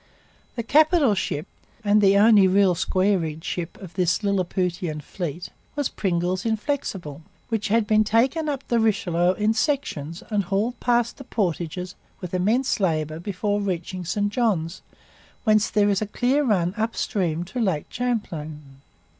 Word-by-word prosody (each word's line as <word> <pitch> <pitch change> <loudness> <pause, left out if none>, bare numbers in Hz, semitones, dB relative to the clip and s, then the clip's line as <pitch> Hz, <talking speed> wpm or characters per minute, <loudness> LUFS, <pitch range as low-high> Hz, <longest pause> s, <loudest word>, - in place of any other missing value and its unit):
The 235 - -3
capital 305 - +4
ship 155 -5 -2 0.4
(and 210 0 +4
the 200 0 +5
only 205 -2 +6
real 190 0 +4
square 185 +3 +1
rigged 160 -1 -5
'ship') 175 -2 -4
of 185 -4 -10
this 180 +2 +1
Lilliputian 180 -4 -1
fleet 175 +2 -5 0.3
was 290 -2 0
Pringle's 180 -1 -1
Inflexible, 210 - -3 0.3
which 225 -3 -1
had 225 +1 +2
been 215 0 +4
taken 255 +9 +1
up 275 -2 -4
the 235 - +2
Richelieu 185 -5 +2
in 210 +3 +1
sections 175 - -2
and 205 -3 +1
hauled 210 +6 -1
past 240 -1 +1
the 270 - -9
portages 180 - -2 0.3
with 180 -2 -7
immense 220 +8 +1
labour 155 -4 0
before 205 +3 -2
reaching 185 -1 -3
St 205 +4 -1
Johns, 190 -8 0 0.6
whence 215 -2 +3
there 205 -1 +3
is 195 - 0
a 215 - -1
clear 255 +7 +1
run 185 -8 +1
upstream 190 -6 -1
to 190 +8 -6
Lake 190 -10 0
Champlain. 155 - -4
200 Hz, 150 wpm, -24 LUFS, 175-225 Hz, 0.6 s, only